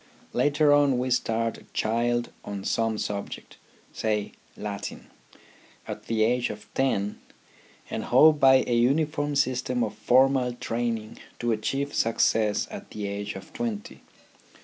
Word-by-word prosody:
Later 145 0 +3
on 145 -3 +4
we 125 +1 -1
start 115 -2 0
a - - -17
child 120 +2 0
on 100 -1 -6
some 115 +1 0
subject, 100 -1 -5 0.4
say 105 -2 -1 0.3
Latin, 100 -1 -6 0.8
at - - -7
the 110 -1 +1
age 120 +2 +1
of 105 0 -8
ten, 105 -7 0 0.7
and - - -4
hope 155 -1 +6
by 130 -1 +6
a 120 - -1
uniform 145 +4 +1
system 125 -2 +1
of 105 -2 -2
formal 125 +3 +3
training 115 -2 -3 0.2
to 120 0 -1
achieve 135 +6 -1
success 110 -2 +2
at - - -8
the 105 -1 -5
age 100 +1 -4
of 95 0 -10
twenty. 110 -4 -4
120 Hz, 135 wpm, -26 LUFS, 110-130 Hz, 0.8 s, hope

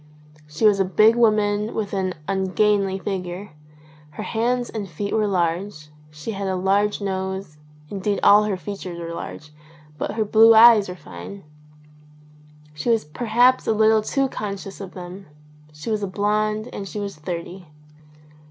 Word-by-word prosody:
She 150 +8 -2
was 205 -2 +5
a - - +4
big 215 +5 +4
woman 215 -2 +2
with 210 -2 -3
an 185 -2 -1
ungainly 195 0 +1
figure; 190 0 -5 0.7
her - - -4
hands 240 +2 -1
and 205 -3 -5
feet 200 +5 -4
were 215 -1 +1
large; 175 -3 -2 0.2
she 150 +7 -7
had 200 -1 -4
a 190 - -1
large 200 +3 +1
nose, 190 -4 -4 0.3
indeed 200 +3 -2
all 210 +1 +6
her 205 -3 -1
features 180 -1 -7
were 170 0 -6
large; 150 -2 -8 0.5
but - - -3
her 220 0 -1
blue 225 +2 +6
eyes 220 -3 +7
were 180 - -6
fine. 90 - -10 1.3
She 150 +10 -4
was 225 -6 +2
perhaps 240 +9 +2
a - - +3
little 220 0 +4
too 270 +5 0
con 210 -5 -4
scious 195 0 -10
of 190 -2 -9
them. 185 +1 -9 0.4
She 150 +9 -6
was 215 -1 -1
a 200 - -2
blonde 210 +3 -1
and 195 - -6
she 210 - -6
was 200 -4 -5
thirty. 175 +3 -6
200 Hz, 160 wpm, -22 LUFS, 185-215 Hz, 1.3 s, eyes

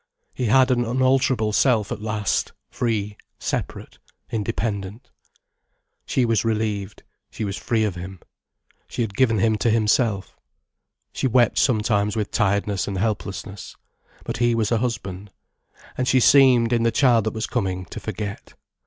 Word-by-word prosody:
He 125 - -3
had 130 +3 +4
an 120 -1 +2
unalterable 130 -2 +1
self 115 -4 +2
at 105 - -4
last, 105 -2 -1 0.2
free, 105 -4 -2 0.2
separate, - - -5 0.3
independent. 105 0 -3 1.0
She 130 - +1
was 115 -2 +1
relieved, 105 -3 -2 0.3
she 110 - -5
was 100 -1 -3
free 115 -1 0
of 105 -3 0
him. 90 +1 -8 0.7
She 120 - -2
had 100 -3 -5
given 115 -2 +3
him 110 +2 +2
to 115 - +1
himself. 110 -2 +1 0.7
She - - 0
wept 120 -2 +3
sometimes 105 -4 +1
with 105 -2 -2
tiredness 100 -3 0
and 100 - -3
helplessness. 100 -1 -4 0.5
But - - -4
he 120 -1 +2
was 110 -1 0
a 115 - +2
husband. 105 -5 -4 0.7
And 125 - -2
she 130 - +4
seemed, 125 -3 +5
in 120 - +2
the 115 - +3
child 115 -2 +3
that 110 - -1
was 110 - -2
coming, 95 -1 -2
to - - -6
forget. 105 -1 -6
110 Hz, 150 wpm, -23 LUFS, 100-120 Hz, 1.0 s, seemed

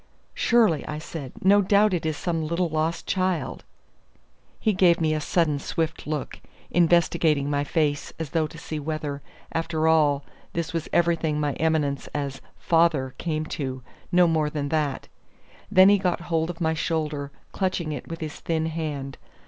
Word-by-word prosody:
"Surely," 220 - +3
I 150 - -4
said. 155 -4 -7
"No 200 +2 +6
doubt 200 +1 +4
it 165 -3 -1
is 155 -1 -2
some 165 -2 -1
little 170 +2 0
lost 160 +1 -1
child." 185 -2 -1 1.0
He 215 - +2
gave 180 -2 +4
me 155 -1 +2
a 155 - -1
sudden, 150 -1 +1
swift 160 +2 -3
look, 150 -2 -4 0.3
investigating 165 -4 +3
my 145 0 +1
face 145 -1 0
as 160 -4 -5
though 160 -2 +1
to 160 - -12
see 160 -1 -5
whether, 150 -1 -4 0.3
after 165 -1 0
all, 150 -3 +3 0.3
this 170 -1 -3
was 165 -2 -3
everything 165 -3 +2
my 145 -2 0
eminence 155 -4 +1
as 140 -2 -3 0.2
"father" 160 -6 +2
came 155 -2 -2
to, 130 -4 -4 0.3
no 180 0 +6
more 160 -3 +2
than 145 -2 -3
that. 150 -3 -1 0.6
Then 190 -1 +7
he 205 0 +5
got 180 -3 0
hold 165 -1 -1
of 175 0 -6
my 160 -2 +1
shoulder, 150 -3 -2 0.2
clutching 185 -4 -1
it 145 -4 -6
with 165 0 -7
his 155 -2 -5
thin 160 -1 -1
hand. 150 -4 -4
160 Hz, 165 wpm, -25 LUFS, 150-170 Hz, 1.0 s, Then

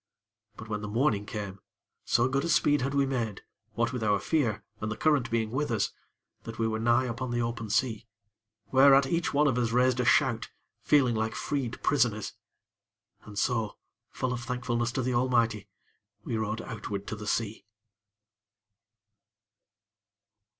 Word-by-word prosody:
But, 110 - -9
when 105 -1 -3
the 105 - -5
morning 105 -2 +1
came, 100 -3 -5 0.5
so 120 +1 +3
good 135 +1 0
a 170 - -2
speed 145 -2 +3
had 135 +2 -1
we 140 -1 +3
made, 120 -7 -2 0.3
what 115 +1 0
with 125 - -3
our 105 -1 +3
fear, 115 -7 0 0.2
and 110 0 -3
the 110 - -4
current 150 -5 +2
being 115 -1 0
with 145 +4 -1
us, 110 -3 0 0.5
that 115 - -8
we 115 - +1
were 110 0 -2
nigh 120 +3 +3
upon 125 +1 -4
the 120 0 0
open 115 -2 -4
sea; 115 0 0 0.6
whereat 135 +1 +7
each 170 +4 0
one 145 +1 +3
of 125 -3 +1
us 120 -2 +1
raised 125 +1 +3
a 125 - +1
shout, 125 -3 +3 0.3
feeling 130 -5 +3
like 110 0 -1
freed 135 -5 -3
prisoners. 115 -7 +1 0.9
And 105 -1 -10
so, 110 -2 0 0.3
full 130 -1 -2
of 120 - -4
thankfulness 120 -1 -2
to 130 - -1
the 125 +1 0
Almighty, 115 -4 +1 0.5
we 115 - -3
rowed 110 0 -2
outward 105 -3 -5
to - - -4
the 105 0 -8
sea. 110 0 -2
120 Hz, 165 wpm, -29 LUFS, 110-130 Hz, 0.9 s, whereat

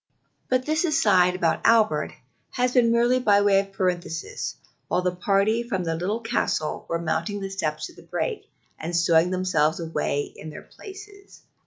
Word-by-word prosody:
But 255 0 +1
this 310 +2 +1
aside 205 - +3
about 170 -3 0
Albert 225 -1 +3 0.4
has 250 -1 0
been 240 -3 +4
merely 240 +2 +3
by 205 -4 +4
way 200 -1 +4
of 195 0 -4
parenthesis 180 -3 -3 0.3
while 180 - 0
the 180 0 -1
party 200 +5 +1
from 230 -6 -3
the 165 -1 -1
Little 190 +8 -2
Castle 225 -9 -2
are 170 - 0
mounting 185 +5 -2
the 195 -1 -5
steps 155 -5 -2
to - - -10
the - - -15
break, - - -4 0.3
and 170 +2 -4
stowing 170 0 +4
themselves 180 -4 +1
away 160 -3 -1
in 155 - -9
their 150 - -10
places. 400 0 -13
195 Hz, 170 wpm, -24 LUFS, 170-235 Hz, 0.4 s, been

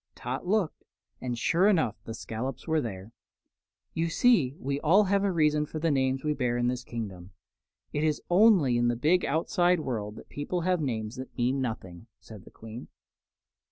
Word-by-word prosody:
Tot 130 +7 -5
looked, 195 -4 0 0.4
and 120 -2 -3
sure 170 - +3
enough 160 - +2
the 115 - -6
scollops 120 +4 -5
were 160 -1 +2
there. 100 -3 -6 0.8
"You 165 +1 0
see 165 - +3
we 140 +1 -2
always 190 +6 +4
have 200 0 +3
a 200 - +2
reason 150 -3 +2
for 155 - -6
the 160 +1 +1
names 130 -1 +1
we 150 -1 +1
bear 125 -4 -1
in 120 0 +1
this 125 0 -3
kingdom. 100 -7 -7 0.6
It 150 - 0
is 155 -2 +1
only 180 - +5
in 120 0 +2
the 120 - +1
big 160 +9 +2
outside 175 +3 +2
world 110 -6 -4
that - - -12
people 170 +5 -3
have 180 -1 +1
names 115 -4 -3
that 130 0 -9
mean 130 +2 +1
nothing," 110 -5 -5
said 110 -3 -13
the - - -13
Queen. 110 +2 -10
135 Hz, 185 wpm, -28 LUFS, 120-165 Hz, 0.8 s, only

